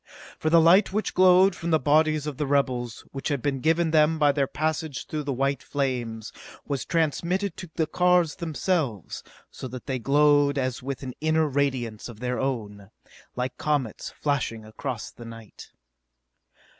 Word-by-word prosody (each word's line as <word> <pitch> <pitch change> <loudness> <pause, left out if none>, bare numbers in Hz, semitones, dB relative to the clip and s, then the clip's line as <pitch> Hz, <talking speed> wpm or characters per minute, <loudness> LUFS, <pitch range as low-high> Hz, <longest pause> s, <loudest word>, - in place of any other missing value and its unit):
] - - -17
For 155 - 0
the 165 +1 +6
light 180 +5 +5
which 215 +2 -2
glowed 185 +1 +5
from 170 - -4
the 160 - +4
bodies 155 +1 +2
of 150 -4 -5
the 150 - -2
rebels, 130 -4 -1
which 135 - -5
had 145 -3 0
been 135 +1 -1
given 160 +3 +2
them 155 0 +4
by 145 -2 +4
their 140 -1 0
passage 155 -1 -2
through 155 - -4
the 140 - -1
white 135 +2 0
flames, 120 -6 -3 0.3
was 140 -3 -3
transmitted 170 +3 0
to 180 - -8
the 160 - +1
cars 180 0 +2
themselves, 160 - -2 0.3
so - - -7
that 125 0 -8
they 130 -2 -2
glowed 145 +2 +3
as 130 -2 -2
with 135 +1 -5
an 130 -1 -5
inner 155 0 +2
radiance 130 -6 -2
of 110 -3 -11
their 125 0 -2
own 105 -7 -4 0.5
like 125 +1 -3
comets 145 -7 -1
flashing 130 -6 -2
across 115 +1 -5
the 120 - -12
night. 115 -2 -11
145 Hz, 170 wpm, -25 LUFS, 125-160 Hz, 0.5 s, the